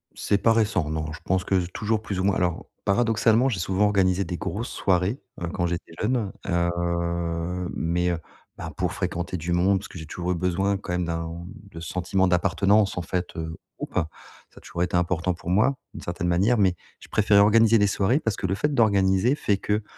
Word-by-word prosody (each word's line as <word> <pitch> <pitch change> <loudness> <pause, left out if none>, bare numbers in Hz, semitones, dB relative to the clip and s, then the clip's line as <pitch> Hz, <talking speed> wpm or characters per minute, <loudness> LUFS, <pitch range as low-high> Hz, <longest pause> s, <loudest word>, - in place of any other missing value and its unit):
C'est 100 - +1
pas 115 - +5
récent 100 -8 +1
non, 80 0 -3
je 80 - -9
pense 95 0 0
que 95 - +2
je 90 - -2
toujours 105 +4 -1
plus 100 -4 -4
ou 95 - 0
moins 100 0 +2
alors 90 -2 -1 0.2
paradoxalement 115 +3 +3
j'ai 105 -7 -2
souvent 95 +4 +1
organisé 100 -2 +2
des 85 -1 -4
grosses 110 +8 -4
soirées, 95 +7 0 0.2
heu, 85 - -2
quand 85 -1 0
j'étais 85 -1 -4
jeune, 110 -3 0 0.2
heu 85 0 -1
mais 90 +2 0
heu, 85 - 0 0.4
bah, - - -6
pour - - -1
fréquenter 85 +2 -3
du 85 +1 -2
monde, 95 +3 +3
parce 100 - -9
que 90 - -10
j'ai 80 - -8
toujours 90 +3 -3
eu - - +1
besoin 95 +3 0
quand 90 -2 -5
même 90 0 0
d'un 85 +1 -4 0.3
de 80 - -8
ce 85 - -6
sentiment 95 +1 +1
d'appartenance, 95 +3 +2
en - - 0
fait, 90 +1 -3
heu, 80 0 -4 0.2
groupe. - - -7
Ça 80 -3 -6
a - - -9
toujours 85 - -3
été 90 0 0
important 90 +1 0
pour 85 0 -8
moi, 120 +8 +3 0.2
d'une - - -8
certaine 90 0 -3
manière 95 +8 +3
mais 95 -4 +3 0.2
je - - -14
préférais 105 -1 +4
organiser 115 +2 +5
des 105 -1 +4
soirées 105 +7 +2
parce 110 -9 -1
que 100 - -2
le 95 - 0
fait 150 +8 0
d'organiser 100 0 +3
fait 100 -8 0
que 105 +1 -1
95 Hz, 215 wpm, -25 LUFS, 85-105 Hz, 0.4 s, pas